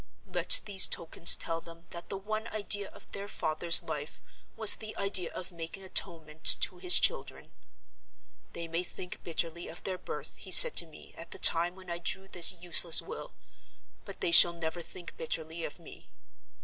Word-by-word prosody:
Let - - +3
these 200 -3 +5
tokens 165 0 +3
tell 165 -1 -6
them 170 0 -16
that 170 0 -10
the 195 - -6
one 215 +3 -7
idea 205 -2 -1
of - - -18
their 200 0 -9
father's 165 -2 0
life 150 +1 -8 0.4
was 220 -2 +4
the 215 -1 -10
idea 195 -3 0
of 185 +1 -9
making 170 +3 -10
atonement 160 -4 -2 0.2
to 180 - -3
his 180 0 +5
children. - - -2 1.0
'They 170 0 -8
may 165 +2 -4
think 180 0 -9
bitterly 170 0 -5
of 165 - -10
their 185 -1 -6
birth,' - - -8
he - - -13
said - - +6
to - - +6
me, - - -18
at - - -11
the - - -8
time 170 +2 +4
when 185 -2 -13
I 170 - -5
drew 190 +3 -3
this 175 -3 +3
useless 175 -2 +3
will; - - -10 0.7
'but - - -13
they 380 -4 -1
shall 175 - +8
never 170 0 -7
think 175 +1 -12
bitterly 160 +1 -6
of 145 - -10
me. 170 - -17
175 Hz, 180 wpm, -28 LUFS, 165-195 Hz, 1.0 s, shall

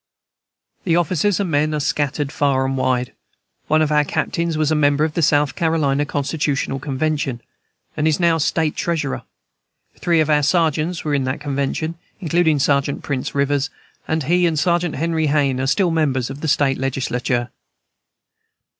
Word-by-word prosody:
The 165 -3 +2
officers 175 +3 +1
and 190 -4 -1
men 150 +1 +1
are - - -1
scattered 145 0 -1
far 140 -3 +1
and 135 0 -1
wide. 130 -1 0 0.5
One 155 +1 +3
of 155 - -1
our 150 0 +4
captains 160 +2 -2
was 155 -1 +1
a - - +3
member 145 0 +3
of 155 -1 -1
the 170 - -1
South 145 -2 +3
Carolina 145 -4 +1
Constitutional 145 -1 -1
Convention, 140 -1 -2 0.6
and 155 0 0
is 155 +1 +1
now 170 -2 +3
State 155 +1 0
Treasurer; 160 -5 -2 0.8
three 170 -2 +2
of 155 - +2
our 150 -1 +3
sergeants 160 +2 +1
were 150 - 0
in 140 -2 +1
that 130 +2 -2
Convention, 145 +3 -3 0.2
including 165 -3 +2
Sergeant 140 0 +1
Prince 140 -2 -3
Rivers; 140 +1 +1 0.4
and 160 -1 0
he 175 +5 +2
and 160 -2 -1
Sergeant 175 +1 +1
Henry 160 +1 0
Hayne 140 -3 +1
are 135 - -1
still 175 +4 +2
members 135 -6 0
of 140 +2 -9
the 160 - -2
State 140 -3 +2
Legislature. 125 -2 -1
150 Hz, 165 wpm, -20 LUFS, 140-160 Hz, 0.8 s, our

